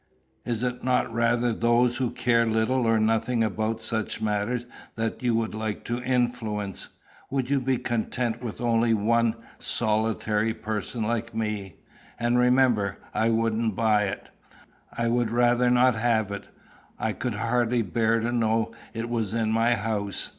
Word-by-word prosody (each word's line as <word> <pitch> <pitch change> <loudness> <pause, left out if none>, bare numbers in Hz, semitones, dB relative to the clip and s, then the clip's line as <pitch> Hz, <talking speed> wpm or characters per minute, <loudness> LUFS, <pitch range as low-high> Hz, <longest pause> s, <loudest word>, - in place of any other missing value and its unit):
Is 115 0 -2
it 125 0 -2
not 125 -2 +1
rather 120 +1 +2
those 120 +2 +2
who 130 -2 0
care 115 -1 +2
little 115 +3 +1
or 115 -1 +3
nothing 115 +2 +1
about 110 +1 -1
such 110 -1 -2
matters 110 +3 -1 0.3
that 115 -1 -3
you 120 -2 +1
would 115 -1 -1
like 110 -1 -4
to 120 +1 -2
influence? 120 -5 -1 0.4
Would 135 -1 -2
you 140 -1 +2
be 130 0 +1
content 120 0 -2
with 120 -4 -6
one 115 -1 +2 0.2
solitary 110 0 0
person 110 +1 -3
like 115 +1 -2
me? 105 -4 -3 0.4
And, 120 +1 +2
remember, 125 -6 +3 0.2
I 115 - +2
wouldn't 115 -1 +1
buy 105 -1 +3
it. 95 - -5 0.6
I 115 - -1
would 120 -1 +1
rather 120 +1 +3
not 125 +1 +5
have 110 -2 +1
it. 100 - -6 0.5
I 110 -1 -1
could 120 -1 -3
hardly 120 +1 +1
bear 115 +3 +1
to 120 +2 -1
know 115 -1 +1 0.2
it 115 +1 -3
was 115 -3 -2
in 110 -1 +1
my 115 +2 +3
house. 105 -2 -2
115 Hz, 155 wpm, -26 LUFS, 110-120 Hz, 0.6 s, not